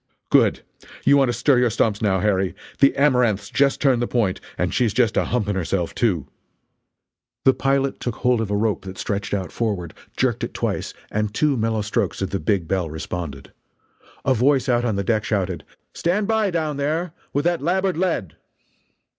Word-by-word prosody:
"Good! - - +4 0.4
You 140 - +6
want 135 -3 +4
to - - +1
stir 125 +3 +3
your 125 -1 +3
stumps, 105 -1 0
now, 95 -4 +2
Harry 95 -2 +1 0.2
the 140 - +5
Amaranth's 125 -8 +2
just 140 0 +2
turned 130 -4 +3
the 120 - 0
point 110 -7 0 0.2
and - - -1
she's 115 -5 +1
just 120 -4 +2
a - - +2
humping 105 -4 -1
herself, 90 -1 -1
too!" 90 - 0 1.2
The 130 - +7
pilot 135 +1 0
took 120 -2 -3
hold 125 -2 +1
of 110 - -3
a 105 - 0
rope 105 0 0
that 95 0 -8
stretched 100 +2 -3
out 95 -4 -2
forward, 100 -8 -2 0.2
jerked - - 0
it - - -4
twice, - - -2 0.2
and 105 -1 -1
two 145 +5 +1
mellow 110 -2 0
strokes 105 - -1
of 95 - -3
the 100 - -1
big 100 -6 0
bell 90 -3 -1
responded. 80 -2 -6 0.7
A 135 - +4
voice 130 +2 +2
out 120 -1 +2
on 110 -4 0
the 100 - -1
deck 110 +1 +1
shouted: 95 -4 -1 0.3
"Stand 195 +4 0
by, 220 -2 +2
down 155 -4 -1
there, 155 +4 -1 0.2
with 145 +3 -1
that 175 -3 +1
labboard 185 +4 +1
lead!" 165 - -1
115 Hz, 190 wpm, -22 LUFS, 100-140 Hz, 1.2 s, The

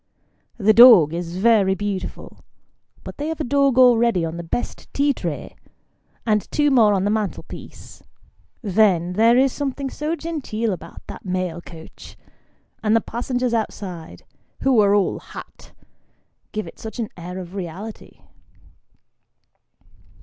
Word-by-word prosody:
The 215 -1 +4
dog 215 - +8
is 170 +1 -4
very 200 -2 +3
beautiful, 200 -1 -5 0.6
but - - -9
they 295 - -2
have 320 0 -4
a - - -1
dog 275 -1 +2
already 235 -7 +4
on 165 +1 -5
the 170 - -5
best 170 +8 -5
tea 285 0 +2
tray, - - -6 0.7
and 210 -2 0
two 295 -1 +2
more 220 -6 +5
on 190 - 0
the 205 - +1
mantelpiece. 210 -7 -6 0.6
Then, 185 -4 +2
there 230 +5 +4
is 265 0 +3
something 275 -1 -3
so 305 +3 -3
genteel 260 - -3
about 180 - -10
that - - -10
mail 185 -2 -3
coach; 165 -2 -13 0.6
and 215 0 +2
the - - +5
passengers 245 +2 -2
outside 185 -7 -5 0.4
(who 265 -4 +3
are 205 -1 +4
all 200 -2 +1
hat) - - -12 0.8
give 215 0 -4
it - - -12
such 220 +2 -8
an 230 -3 -3
air 180 +1 -8
of 180 -1 -8
reality 195 +3 -8
215 Hz, 140 wpm, -21 LUFS, 185-250 Hz, 0.8 s, dog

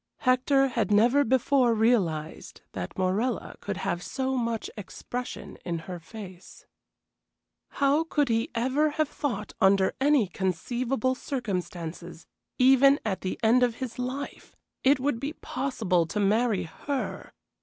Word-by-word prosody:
Hector 270 +2 +3
had 235 -4 -1
never 235 +7 +4
before 255 -1 +3
realized 185 -9 0
that 90 -1 -6
Morella 200 +6 -1
could 205 -2 -4
have 190 -3 -2
so 265 +6 -2
much 230 -3 -1
expression 245 +4 -7
in 170 -2 -2
her 175 +2 -7
face. 185 0 -11 1.0
How 280 +3 +2
could 295 -3 +1
he 230 -1 0
ever 265 +6 +2
have 310 -1 +2
thought 215 -9 -4
under 195 0 +4
any 285 -4 +4
conceivable 235 +8 -1
circumstances, 180 - -5 0.3
even 270 +2 +6
at 195 -3 -2
the 185 - -4
end 235 +3 +5
of 245 -2 +2
his 250 -1 -6
life, 260 +3 -5 0.3
it 270 +1 +4
would 265 -3 0
be 285 +4 -3
possible 220 - -1
to 210 - -3
marry 215 +1 +2
her! 270 - -5
235 Hz, 135 wpm, -27 LUFS, 190-265 Hz, 1.0 s, even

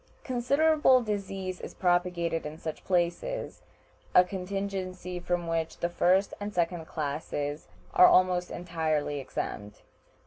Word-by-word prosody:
Considerable 265 +1 +3
disease 195 -3 -4
is - - -8
propagated 175 -2 +1
in 150 +1 -6
such 160 -1 -6
places, 185 - -1 0.5
a 180 - +9
contingency 185 -1 -4
from 175 0 -1
which 165 -1 -2
the 170 - -1
first 185 +3 +2
and 205 +1 -4
second 170 -2 -1
classes 145 0 -3 0.3
are 180 - +8
almost 180 -1 +4
entirely 155 -4 -1
exempt. 105 -5 -5
180 Hz, 115 wpm, -29 LUFS, 165-195 Hz, 0.5 s, a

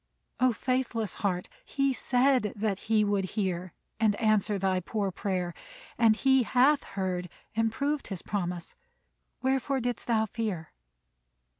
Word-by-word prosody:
O 255 0 +5
faithless 235 -3 -1
heart! 180 -4 0 0.2
He 275 -1 0
said 250 -3 +2
that 205 -2 -1
he 215 -1 +4
would 205 -1 +1
hear 185 -3 -1 0.3
And 215 -2 +3
answer 215 -2 +2
thy 190 -1 +1
poor 200 +2 -2
prayer, 180 -2 -2 0.4
and 225 -2 +5
he 265 +2 +4
hath 260 +5 +4
heard 185 -2 -3 0.3
And 225 0 +2
proved 285 +5 -1
his 195 -4 -6
promise. 180 -3 -3 0.7
Wherefore 265 +1 +1
didst 245 -2 -3
thou 220 -2 +3
fear? 205 -7 -4
215 Hz, 135 wpm, -29 LUFS, 190-250 Hz, 0.7 s, O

